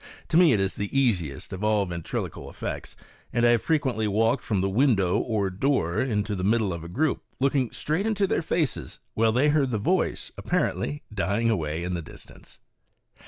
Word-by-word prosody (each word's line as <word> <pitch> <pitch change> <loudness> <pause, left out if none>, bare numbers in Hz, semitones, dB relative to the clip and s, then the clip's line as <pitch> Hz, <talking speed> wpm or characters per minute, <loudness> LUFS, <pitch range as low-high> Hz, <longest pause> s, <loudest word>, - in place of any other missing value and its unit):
To 160 - +3
me 175 -3 +7
it 110 - +3
is 95 0 0
the 100 +7 -1
easiest 90 - -1
of 95 +2 -5
all 105 -2 +2
my 90 -2 -5
ventrnoquial 85 - -5
effects, - - -6 0.4
and 120 0 +2
I 120 - +6
have 120 - +3
frequently 130 -9 0
walked 115 +5 +1
from 105 -5 0
the 95 - +1
window 100 -4 +2
or 105 -5 -1
door 95 - +1
into 105 -5 -1
the 90 - -4
middle 105 -1 +2
of 85 -1 -6
a - - -7
group, 145 - 0 0.2
looking 135 -2 +2
straight 170 +8 -1
into 205 -2 +1
their 185 - 0
faces, 140 - -2 0.2
while 110 0 +3
they 130 +6 +3
heard 145 -3 +2
the 115 - 0
voice 180 - 0
apparently 155 -4 -1
dying 105 +3 +1
away 80 -4 -2
in 90 +1 -2
the 85 - -2
distance. - - -13
110 Hz, 195 wpm, -26 LUFS, 95-140 Hz, 0.4 s, me